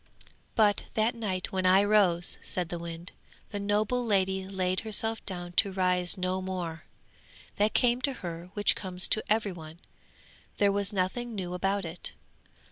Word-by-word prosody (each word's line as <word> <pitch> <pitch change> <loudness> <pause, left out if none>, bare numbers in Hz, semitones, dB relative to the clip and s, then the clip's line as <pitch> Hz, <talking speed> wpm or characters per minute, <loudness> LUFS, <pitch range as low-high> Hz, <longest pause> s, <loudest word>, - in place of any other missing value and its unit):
'But 210 -2 +3
that 220 +2 +2
night 200 -6 -3
when 185 -1 0
I 190 +2 +6
rose,' 195 -5 +4
said 180 -2 -2
the 175 - -4
wind, 170 +1 -7 0.4
'the 205 - -3
noble 210 +4 0
lady 190 -3 +1
laid 185 -1 -1
herself 225 +1 -2
down 175 -2 -3
to 200 - +6
rise 180 0 +1
no 185 0 -1
more; 175 -4 -5 0.7
that 210 +1 +1
came 245 0 +3
to 275 +1 0
her 170 +1 -6
which 205 -1 +3
comes 185 -1 0
to 215 - +2
every 215 -2 +2
one 160 -1 -10 0.8
there 200 -1 +3
was 200 0 -1
nothing 215 +5 -2
new 180 -3 -4
about 195 +1 -1
it. 165 +1 -7
190 Hz, 160 wpm, -29 LUFS, 180-210 Hz, 0.8 s, I